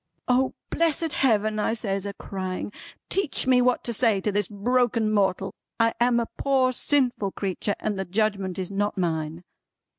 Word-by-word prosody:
"O 255 +1 +2 0.2
blessed 330 -1 +1
Heaven," 215 -4 +2
I 225 - +1
says 200 -3 -2
a 200 - -4
crying, 185 0 -4 0.4
"teach 390 -6 0
me 255 -1 +5
what 250 0 +2
to 235 - -2
say 225 -3 +3
to 210 - 0
this 205 -1 0
broken 230 +1 +1
mortal! 195 -2 +1 0.3
I 230 0 +3
am 240 0 +3
a 235 - 0
poor 265 -2 +3
sinful 250 -7 0
creetur, 200 +1 -2
and 210 -2 -2
the 190 - -2
Judgment 195 -1 -1
is 185 0 -4
not 205 +1 -1
mine." 165 -1 -2
215 Hz, 170 wpm, -25 LUFS, 195-250 Hz, 0.4 s, me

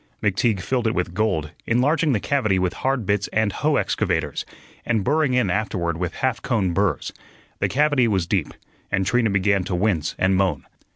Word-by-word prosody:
McTeague 105 0 +1
filled 120 +3 -1
it 110 - 0
with 90 -1 -2
gold, 85 -8 0 0.2
enlarging 145 +6 +2
the 115 - +1
cavity 110 -6 +1
with 90 0 0
hard 130 -4 0
bits 100 0 0
and 110 -1 +1
hoe - - +1
excavators, - - -1 0.4
and 110 -4 0
burring 145 0 +2
in 120 -7 +2
afterward 90 -5 -1
with 90 0 -3
half 130 -3 -1
cone 100 -8 0
burrs. 95 -3 0 0.5
The - - +1
cavity 145 -3 +3
was 95 -5 +1
deep, 90 -3 0 0.4
and 95 -1 +1
Trina 120 +2 +2
began 95 0 +2
to 90 - -2
wince 90 -5 0
and 95 +1 +2
moan. 95 -7 0
105 Hz, 180 wpm, -22 LUFS, 95-125 Hz, 0.5 s, cavity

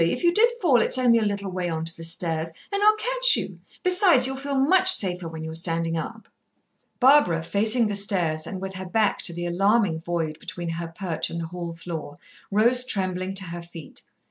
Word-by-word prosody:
If 170 - -1
you 345 0 +3
did 455 +5 +4
fall 275 - +3
it's - - +2
only 240 -2 +3
a 220 - -1
little 200 -2 -3
way 180 -1 -3
on 160 -1 -3
to 165 - -1
the 165 - -9
stairs, 165 -1 -2 0.2
and 400 0 -2
I'll 425 +1 +5
catch - - +3
you. - - -5 0.2
Besides, 360 - +5
you'll 265 +1 -1
feel 275 +1 -4
much 370 +7 +4
safer 180 - +1
when 160 -1 -8
you're 160 0 -6
standing 165 0 -1
up." 220 +8 -6 0.7
Barbara, 250 - +4
facing 215 +7 +2
the 210 - -2
stairs, 175 -6 -1
and 190 - -6
with 190 0 -6
her 185 0 -7
back 215 +2 0
to - - -3
the 175 +1 -5
alarming 195 0 +1
void 165 -2 -4
between 175 0 -6
her 165 0 -4
perch 165 0 -3
and 170 - -5
the 165 - -4
hall 175 -1 -6
floor, 165 -3 -8 0.3
rose 235 +5 +4
trembling 185 -4 -2
to 195 - +1
her 175 -1 -7
feet. 170 -2 -11
185 Hz, 210 wpm, -24 LUFS, 165-245 Hz, 0.7 s, I'll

